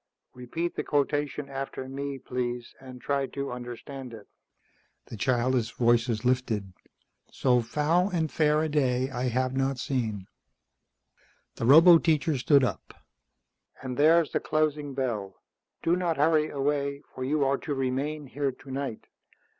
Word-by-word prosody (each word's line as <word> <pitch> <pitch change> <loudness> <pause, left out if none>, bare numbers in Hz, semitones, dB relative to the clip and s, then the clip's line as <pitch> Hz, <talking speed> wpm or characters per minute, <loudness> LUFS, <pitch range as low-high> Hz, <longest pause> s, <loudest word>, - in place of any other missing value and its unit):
Repeat 165 +8 -4
the - - -2
quotation 145 0 -1
after 135 -1 -5
me, 140 +1 -5
please, 125 -1 -4
and 130 -1 -11
try 140 +1 -1
to 140 +1 -5
understand 125 +1 -8
it." 105 -2 -13 0.8
The - - -9
childish 120 +1 +1
voices 115 -1 +1
lifted. 115 -7 0 0.6
"So 125 -2 +2
foul 155 - +1
and 165 -5 -1
fair 150 0 +2
a - - 0
day 130 -3 +1
I 125 0 -2
have 130 +1 0
not 135 0 0
seen." 110 -7 -2 1.3
The - - -2
roboteacher 160 0 +6
stood 140 +2 +4
up. 105 -10 -3 0.9
"And 130 -1 -4
there's 160 +3 +4
the - - 0
closing 150 -2 -1
bell. 110 -8 -3 0.5
Do 170 - +3
not 175 -3 -1
hurry 155 +1 +3
away, 140 0 -1
for 130 - -5
you 145 +2 +1
are 135 +1 +1
to 145 - -3
remain 135 +3 -2
here 140 +1 -2
tonight. 135 -2 -6
135 Hz, 140 wpm, -27 LUFS, 125-150 Hz, 1.3 s, roboteacher